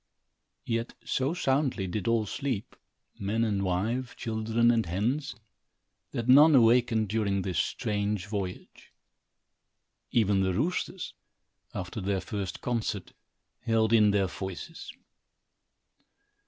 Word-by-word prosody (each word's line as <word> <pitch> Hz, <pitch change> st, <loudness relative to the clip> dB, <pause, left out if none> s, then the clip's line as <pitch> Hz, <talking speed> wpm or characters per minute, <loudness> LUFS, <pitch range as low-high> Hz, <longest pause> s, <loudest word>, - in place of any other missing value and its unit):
Yet 115 Hz, 0 st, -2 dB
so 135 Hz, +6 st, 0 dB
soundly 135 Hz, -, +1 dB
did 95 Hz, +2 st, -3 dB
all 115 Hz, -2 st, +2 dB
sleep, 130 Hz, -1 st, -3 dB, 0.4 s
man 105 Hz, +4 st, 0 dB
and 105 Hz, -3 st, 0 dB
wife, 110 Hz, +8 st, -1 dB
children 115 Hz, +1 st, +1 dB
and 115 Hz, -1 st, +2 dB
hens, 125 Hz, -, -1 dB, 0.7 s
that 115 Hz, -, -4 dB
none 145 Hz, +4 st, +8 dB
awakened 115 Hz, -2 st, +4 dB
during 100 Hz, -2 st, 0 dB
this 90 Hz, -3 st, -1 dB
strange 105 Hz, -2 st, -1 dB
voyage. 100 Hz, -3 st, -6 dB, 1.2 s
Even 105 Hz, -4 st, +2 dB
the 95 Hz, -1 st, +1 dB
roosters, 180 Hz, -, -2 dB, 0.6 s
after 90 Hz, +4 st, -4 dB
their 95 Hz, 0 st, 0 dB
first 95 Hz, +1 st, -5 dB
concert, 110 Hz, -6 st, -2 dB, 0.5 s
held 115 Hz, -1 st, +1 dB
in 105 Hz, -2 st, +6 dB
their 100 Hz, -1 st, +2 dB
voices. 95 Hz, 0 st, -7 dB
110 Hz, 110 wpm, -29 LUFS, 100-120 Hz, 1.2 s, none